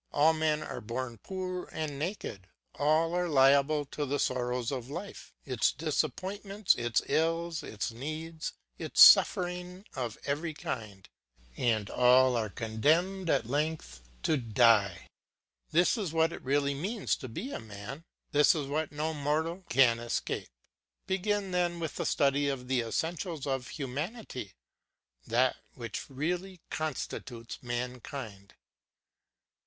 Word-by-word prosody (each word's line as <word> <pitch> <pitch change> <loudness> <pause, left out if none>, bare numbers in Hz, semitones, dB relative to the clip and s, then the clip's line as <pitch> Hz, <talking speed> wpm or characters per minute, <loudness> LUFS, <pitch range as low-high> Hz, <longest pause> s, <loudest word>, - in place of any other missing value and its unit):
All 155 +3 +5
men 155 -1 +1
are - - -6
born 120 +1 -4
poor 185 - -4
and 150 -3 -4
naked, 150 - -4 0.3
all 155 +3 +2
are 180 0 0
liable 140 +1 +4
to 150 - -2
the 145 0 -1
sorrows 125 -2 -1
of 130 -2 -4
life, 175 +7 -7
its 130 -4 +2
disappointments, 190 - 0
its 120 -1 0
ills, 165 +1 0
its 105 +1 -4
needs, 155 +6 -5 0.3
its - - -3
suffering 180 0 +6
of 120 -4 -3
every 155 +3 -2
kind; 105 -9 -6 0.5
and 110 - +1
all 125 +1 +5
are 110 -2 0
condemned 160 - +1
at - - +2
length 145 - -2 0.2
to 155 - +2
die. 115 -5 +3 0.6
This 175 +3 +4
is 190 -7 -2
what 165 +1 +2
it - - -7
really 140 +1 +1
means 195 +10 -1
to 130 - -7
be 230 - -5
a - - -4
man, 110 +7 -8 0.3
this 150 +3 +5
is 150 -3 -2
what 150 +3 -2
no 155 +2 -2
mortal 160 +5 -1
can 120 -3 +5
escape. 120 0 -3 0.6
Begin 195 +1 0
then 175 -1 0
with 160 -3 -4
the - - -1
study 140 0 +2
of 130 -2 -4
the 130 -1 +2
essentials 160 - -3
of 135 -3 -2
humanity, 140 - -5 0.7
that 125 +3 +2 0.2
which 115 0 -6
really 175 +7 -3
constitutes 130 -6 -4
mankind. 120 -4 -5
145 Hz, 135 wpm, -30 LUFS, 125-165 Hz, 0.7 s, suffering